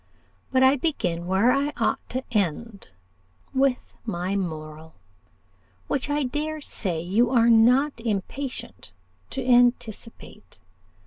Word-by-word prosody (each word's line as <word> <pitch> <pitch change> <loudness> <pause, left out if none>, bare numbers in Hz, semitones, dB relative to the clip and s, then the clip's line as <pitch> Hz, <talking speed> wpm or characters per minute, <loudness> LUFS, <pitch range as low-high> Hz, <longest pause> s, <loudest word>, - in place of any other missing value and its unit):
But 260 0 +3
I 265 +2 +5
begin 180 - -2
where 195 +7 +3
I 280 +2 0
ought - - +1
to 255 +1 -3
end 205 - -2 0.6
with 265 -1 0
my 185 -3 -3
moral, 160 -3 -5 0.9
which 280 +1 -2
I 290 0 0
dare 300 +4 -3
say 185 - -2
you 200 +8 +1
are 235 -2 +4
not 250 +6 +5
impatient 230 +5 -5 0.4
to 265 -2 -4
anticipate. 240 - 0
235 Hz, 115 wpm, -25 LUFS, 190-265 Hz, 0.9 s, I